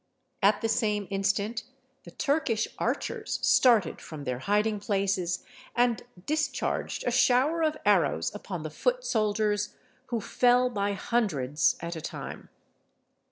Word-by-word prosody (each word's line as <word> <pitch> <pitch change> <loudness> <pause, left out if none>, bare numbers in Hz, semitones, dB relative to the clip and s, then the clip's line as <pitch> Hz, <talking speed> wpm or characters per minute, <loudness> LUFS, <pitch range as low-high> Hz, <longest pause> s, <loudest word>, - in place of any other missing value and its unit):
At 205 +1 +4
the 225 - +1
same 210 -3 0
instant 200 +3 0 0.4
the - - -9
Turkish 280 -7 0
archers 435 - -2
started 250 -9 +4
from 155 -3 -8
their 125 -2 -3
hiding 210 +6 +1
places, 195 -3 -1 0.3
and 240 -3 +2 0.2
discharged 305 0 -1
a 245 - +1
shower 255 +6 +3
of 310 -1 +1
arrows - - +2
upon - - -6
the - - -5
foot - - 0
soldiers, 210 - 0 0.3
who 235 -2 -1
fell 250 +3 +3
by 200 -2 -1
hundreds 155 - +1
at 170 +1 -4
a 160 - -6
time. - - -7
215 Hz, 130 wpm, -28 LUFS, 195-250 Hz, 0.4 s, At